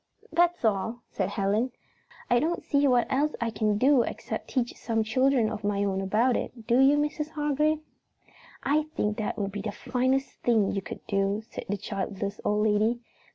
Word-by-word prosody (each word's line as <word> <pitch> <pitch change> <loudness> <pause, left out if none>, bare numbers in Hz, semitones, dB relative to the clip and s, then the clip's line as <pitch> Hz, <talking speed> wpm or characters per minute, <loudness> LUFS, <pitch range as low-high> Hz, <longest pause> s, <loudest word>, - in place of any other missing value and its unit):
"That's 345 -3 +2
all," 225 +3 0
said 190 -1 -1
Helen. 210 +5 0 0.5
"I 240 - +4
don't 335 +5 -1
see 285 -1 +2
what 245 -2 +4
else 290 +3 +1
I 235 -1 -1
can 215 -2 +1
do 265 +3 +5
except - - -4
teach 245 -3 -1
some 225 -1 -1
children 255 +1 +2
of 215 -1 -5
my 205 0 0
own 195 -1 0
about 220 +6 +2
it, 230 -3 -5
do 240 +2 +3
you, 275 +2 +6
Mrs. 300 +1 -1
Hargrave?" 300 0 0 0.8
"I 295 +2 +2
think 210 0 0
that 215 - -2
would 200 -1 -2
be 205 +1 -4
the 210 - -3
finest 260 +4 -1
thing 220 -5 +3
you 195 - -2
could - - -9
do," 200 +1 0
said - - -6
the 205 - 0
childless 200 0 -4
old 210 +1 +1
lady. 215 +3 +2
230 Hz, 185 wpm, -27 LUFS, 205-270 Hz, 0.8 s, you